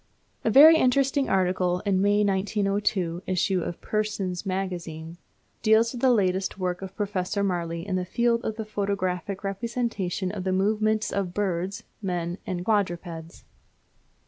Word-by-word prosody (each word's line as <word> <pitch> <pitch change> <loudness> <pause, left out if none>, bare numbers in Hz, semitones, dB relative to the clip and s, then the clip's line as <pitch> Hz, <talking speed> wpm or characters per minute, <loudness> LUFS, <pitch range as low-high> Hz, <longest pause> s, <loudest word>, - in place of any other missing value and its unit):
A - - +2
very 300 +8 +9
interesting 270 +1 +2
article 180 -1 +1
in 200 -2 +1
the - - +1
May, 205 +1 +3
1902, 195 -3 0
issue 185 0 +1
of 170 - -5
Pearson's 210 -4 -2
Magazine 175 -3 -4 0.4
deals 225 +2 +4
with 240 - -6
the 260 - +5
latest 190 -5 +1
work 180 -1 -2
of 190 0 -8
Professor 200 -1 -2
Marey 170 -3 -2
in 190 -2 -1
the 180 - -1
field 235 +5 +1
of 220 - -2
the 220 -1 -5
photographic 200 -2 -2
representation 200 -3 -2
of 195 -2 -5
the 185 0 0
movements 215 +2 +1
of 200 -1 0
men, - - -10
birds, 190 -1 -2 0.2
and 175 0 -3
quadrupeds. 175 -5 -2
195 Hz, 145 wpm, -26 LUFS, 180-215 Hz, 0.4 s, very